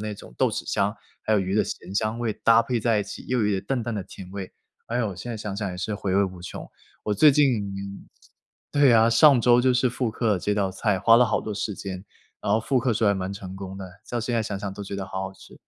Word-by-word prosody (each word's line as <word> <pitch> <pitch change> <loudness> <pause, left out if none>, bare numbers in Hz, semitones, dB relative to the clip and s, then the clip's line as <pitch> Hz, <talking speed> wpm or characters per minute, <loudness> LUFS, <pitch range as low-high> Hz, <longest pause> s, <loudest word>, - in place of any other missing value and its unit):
那 105 -1 -4
种 - - -13
豆 - - +4
豉 - - -4
香， 100 +3 0 0.2
还 110 - +1
有 - - +4
鱼 95 0 -1
的 105 - +4
咸 90 +2 -7
香 110 +2 0
味 120 -2 -1
搭 115 +2 +4
配 120 -1 -1
在 110 -1 +2
一 - - +1
起， 100 - -9
又 125 - 0
有 105 - +2
一 - - +1
点 95 -1 -1
淡 125 +4 -2
淡 115 0 -3
的 100 - -3
甜 95 0 -11
味， 95 -1 -6 0.4
哎 115 - -2
哟， 120 -3 0
我 95 - -7
现 120 +7 -6
在 115 - -4
想 105 -2 -5
想 100 -2 -3
也 90 - -7
是 100 +4 -3
回 100 -2 -2
味 100 +1 +4
无 95 -2 -7
穷。 90 - -7 0.4
我 105 - -1
最 150 +9 +6
近 100 -9 0 0.6
对 145 -2 +5
啊， 115 0 +5
上 135 +3 +6
周 120 0 +5
就 130 0 +3
是 125 0 +2
复 125 -1 -2
刻 110 -3 0
这 105 +3 -1
道 100 -2 0
菜， 95 0 0
花 115 - +5
了 125 +1 +5
好 - - 0
多 110 - -5
时 105 0 -3
间， 95 -1 -7 0.4
然 100 - -1
后 110 - +3
复 130 +4 +1
刻 125 -1 +1
时 110 - 0
候 - - +5
还 100 - +3
蛮 95 0 -3
成 95 -2 -8
功 95 0 -7
的， 95 - -6 0.2
到 120 - -1
现 120 +1 -2
在 115 - +1
想 100 -2 -4
想 100 0 -5
都 100 - -7
觉 100 - -6
得 95 -1 -4
好 95 0 -4
好 95 0 -5
吃。 - - -16
105 Hz, 310 characters per minute, -25 LUFS, 95-115 Hz, 0.6 s, 最